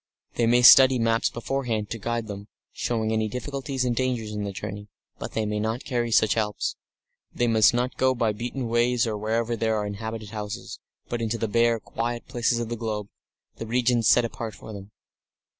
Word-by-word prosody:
They 115 - +1
may 120 +1 +4
study 130 +1 +9
maps 115 -1 +2
beforehand 120 -4 -3
to 115 - -4
guide 120 +2 -2
them, 100 -1 -8 0.3
showing 110 -2 -1
any 110 0 +1
difficulties 135 +3 -3
and 120 -1 0
dangers 120 -4 -1
in 105 -1 -3
the 100 - -3
journey, 100 +1 -7 0.3
but - - -6
they 110 - -1
may 105 0 -2
not 110 +4 -2
carry 120 -2 -1
such 110 -1 +4
helps. 105 -2 -1 0.6
They 120 - 0
must 110 -2 +5
not 125 +1 -1
go 130 0 +2
by 115 -2 +1
beaten 120 +4 -4
ways 120 +1 +2
or 110 -2 -2
wherever 115 +3 -1
there 110 0 0
are 105 - -1
inhabited 110 +1 -6
houses, 105 -2 -6 0.3
but 120 -1 -3
into 115 0 -1
the 115 - -1
bare, 115 +1 +2
quiet 120 +2 -4
places 120 0 0
of 120 -1 -3
the 120 - -2
globe 105 -3 -4 0.5
the 115 - -6
regions 120 -1 +2
set 120 - +5
apart 115 -2 -6
for 110 - -10
them. 100 -1 -9
115 Hz, 195 wpm, -25 LUFS, 110-120 Hz, 0.6 s, study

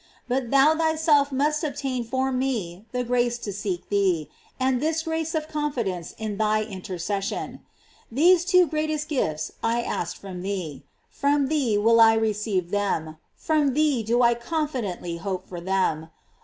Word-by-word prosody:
But 250 -1 -1
thou 275 +4 +5
thyself 315 -3 +3
must 300 +4 +1
obtain 270 -4 -2
for 260 +3 -1
me 225 -8 -2
the 250 0 -1
grace 240 0 +1
to 210 -4 -5
seek 190 -3 -4
thee, 185 -7 +1 0.3
and 260 -1 +1
this 315 +1 0
grace 320 0 -2
of 310 -1 -1
confidence 240 - -3
in 215 -2 -4
thy 215 0 +2
intercession. 195 -1 -4 0.5
These 340 +8 +5
two 365 0 +5
greatest 310 0 -2
gifts 155 - -1
I 235 +1 +1
ask 175 - -3
from 185 -2 -7
thee 185 -7 -4 0.2
— - - -43
from 280 -1 +2
thee 270 -9 +1
will 230 +2 +5
I 225 0 +7
receive 210 -5 -1
them 160 -6 -1
— - - -47
from 300 -5 +2
thee 295 -5 +2
do 235 +3 +2
I 240 0 +5
confidently 235 - -3
hope 185 0 -4
for 175 -2 -7
them. 170 -4 0
235 Hz, 160 wpm, -25 LUFS, 195-290 Hz, 0.5 s, I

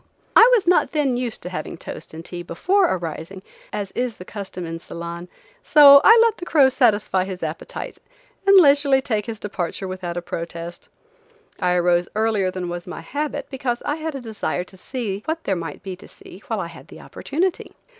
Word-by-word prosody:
I 460 - +9
was 425 - +1
not 355 -1 +3
then 285 -5 +1
used 245 -2 -4
to 180 - -5
having 170 -1 -6
toast - - -9
and 165 +1 -9
tea 175 -1 -7
before 365 - +1
arising, 170 +2 -5 0.3
as 200 -2 -4
is 245 -2 -3
the 180 - -10
custom 190 -4 -7
in 165 0 -5
Ceylon, 170 +1 -7 0.3
so 280 -2 +8
I 450 - +8
let 460 -2 +2
the - - -8
crow 280 -5 +5
satisfy 215 -7 +2
his 185 -2 -6
appetite 160 0 -6 0.5
and 395 0 +8
leisurely 285 -4 +5
take 215 -6 -2
his 225 -2 -5
departure 190 -2 -4
without 185 -2 -5
a - - -2
protest. 170 0 -7 0.7
I 180 -1 +1
arose 175 0 +2
earlier 215 -3 +1
than 185 -1 -4
was 175 0 -6
my 180 - -7
habit, 290 - -4
because 255 -3 -3
I 295 - -1
had 315 -2 -4
a 270 - -5
desire 220 -5 -3
to 185 - -14
see 205 -1 -4
what 325 +1 -3
there 195 - 0
might 165 0 -6
be 190 -2 -5
to - - -14
see 190 - -14
while 225 -4 -2
I - - -3
had 170 - -13
the - - -13
opportunity. 350 +5 -3
200 Hz, 195 wpm, -22 LUFS, 175-275 Hz, 0.7 s, I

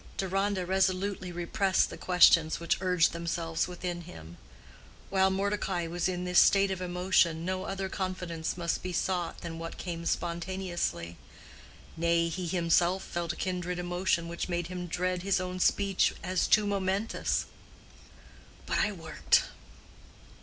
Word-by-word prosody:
Deronda 195 0 0
resolutely 190 0 0
repressed 185 +3 +1
the - - -6
questions 165 -3 +5
which 170 +1 0
urged 180 -3 +3
themselves 170 -1 -2
within 175 -1 -4
him. 85 - -11 0.7
While 190 0 +4
Mordecai 195 -2 -1
was 175 +2 -1
in 180 -1 -3
this 180 0 +4
state 195 -1 +5
of 185 -1 -3
emotion, 180 -2 +1
no 185 +1 -2
other 195 0 -3
confidence 180 -4 -3
must 170 -1 -1
be 185 0 -4
sought 180 -1 -1
than 165 -1 -6
what 165 0 -6
came 170 -2 -5
spontaneously: 175 - -2 0.8
nay, 170 0 +2
he 175 +2 -4
himself 175 +2 +2
felt 170 -1 -3
a - - -10
kindred 180 -1 -3
emotion 175 -1 0
which 170 +2 -4
made 175 -1 -2
him 180 -1 -5
dread 180 +1 -1
his 195 +1 +1
own 185 0 -4
speech 195 +1 +2
as 185 0 0
too 215 -1 +4
momentous. 200 +1 -1 1.2
"But - - 0
I 210 - +2
worked. 165 -4 +2
180 Hz, 140 wpm, -29 LUFS, 170-190 Hz, 1.2 s, questions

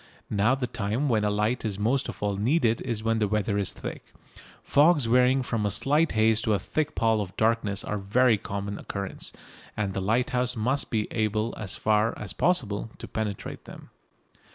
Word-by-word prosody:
Now 105 +5 +3
the 135 -2 -2
time 115 +5 -1
when 110 -3 +2
a 105 - +2
light 105 +4 0
is 105 -4 -2
most 120 +6 0
of - - -7
all 100 -1 0
needed 115 +2 +1
is 115 -4 -3
when 115 0 +1
the 105 - +2
weather 105 0 0
is 100 - -1
thick. - - -8 0.5
Fogs 150 -1 +4
varying 125 +3 +4
from 115 -3 -2
a 105 - +1
slight 140 +10 +2
haze 110 0 +3
to 110 -2 +2
a - - +2
thick 150 +7 -2
pall 110 -1 +2
of 95 -2 -7
darkness 110 -3 +1
are 105 - -3
of 100 - -8
very 115 +1 +4
common 100 +1 -4
occurrence, 100 -1 -5 0.5
and 100 -2 -1
the 95 - -2
lighthouse 125 +4 0
light 110 - -3
must 135 +4 +1
be 110 -3 0
able 110 +1 0
as 105 -3 -3
far 110 +1 +1
as 95 -4 -6
possible 125 - 0
to - - -8
penetrate 105 -3 -5
them. - - -12
110 Hz, 200 wpm, -27 LUFS, 105-125 Hz, 0.5 s, Fogs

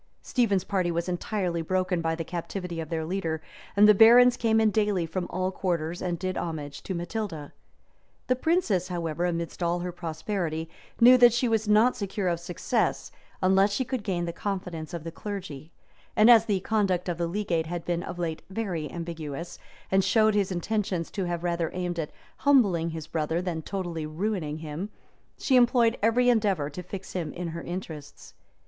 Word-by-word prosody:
Stephen's 205 -7 +1
party 185 -3 0
was 170 +1 -1
entirely 180 -1 -2
broken 185 +1 0
by 165 0 0
the 165 - -4
captivity 175 +1 -5
of 160 -2 -5
their 160 -1 -2
leader, 165 -2 -2 0.4
and 210 +1 +8
the 210 - +8
barons 240 +4 +7
came 225 -2 +2
in 220 -1 +3
daily 205 -5 +1
from 175 +2 -3
all 185 +1 -1
quarters, 175 -3 -2
and 175 -2 -2
did 185 +1 -3
homage 150 -4 -5
to 190 - -4
Matilda. 175 -4 -4 0.7
The 255 - +2
princess, 250 - +1
however, 170 -1 -2
amidst 170 0 -4
all 175 0 0
her 180 0 -3
prosperity, 165 -1 -3 0.3
knew 250 +2 +8
that 240 -2 +7
she 245 +1 +1
was 225 -1 +1
not 215 +4 +4
secure 200 -2 -3
of 170 -1 -1
success, 175 +6 -1 0.3
unless 195 +2 +4
she 260 +5 0
could 255 -3 -3
gain 180 -4 -1
the 170 - -4
confidence 180 -5 -4
of 165 - -6
the 165 - -6
clergy; 175 -7 -7 0.4
and 215 +3 +7
as 225 -2 +7
the 200 -4 0
conduct 195 -4 0
of 175 -1 -2
the 170 - 0
legate 170 -3 -1
had 175 0 -5
been 175 -1 -1
of 175 - -6
late 165 -2 -3
very 190 -7 -3
ambiguous, 165 -1 -6 0.3
and 190 0 +4
showed 215 0 +4
his 200 -2 +1
intentions 185 -1 -2
to 195 - -2
have 175 -1 -3
rather 170 -2 0
aimed 175 -2 -2
at 155 - -2 0.3
humbling 200 - +3
his 160 -2 -6
brother, 160 +1 -1
than 175 -3 -3
totally 170 -3 -4
ruining 160 -2 -2
him, 160 +5 -5 0.5
she 265 - +1
employed 240 -1 +4
every 230 +3 +3
endeavor 200 -11 +2
to 180 - -6
fix 190 +1 -8
him 170 -5 -3
in 175 -1 -4
her 170 +1 -6
interests. 160 -5 -8
180 Hz, 185 wpm, -27 LUFS, 165-210 Hz, 0.7 s, and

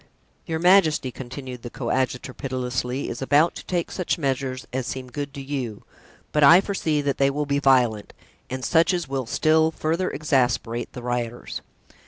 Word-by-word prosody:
"Your 160 - -1
majesty," 165 -6 +4
continued 130 0 -8
the 120 - -7
coadjutor, 130 +1 -2
pitilessly, 125 0 -3
"is 120 - -5
about 145 +5 +3
to - - -9
take 175 -2 -1
such 180 -1 -1
measures 135 -3 -2
as 130 -1 -2
seem 130 -1 -5
good 145 0 -4
to 140 - -6
you, 130 -6 -4 0.5
but 150 - +2
I 165 +6 +9
foresee 165 -7 -1
that 140 -1 -1
they 135 0 +4
will 145 +2 -1
be 140 0 0
violent 125 -6 +3 0.4
and 130 0 -4
such 170 +3 +3
as 175 -4 -3
will 135 -3 -3
still 160 +4 +3
further 165 +3 -1
exasperate 125 -5 0
the 125 - -8
rioters." 120 -1 -3
135 Hz, 170 wpm, -24 LUFS, 125-155 Hz, 0.5 s, I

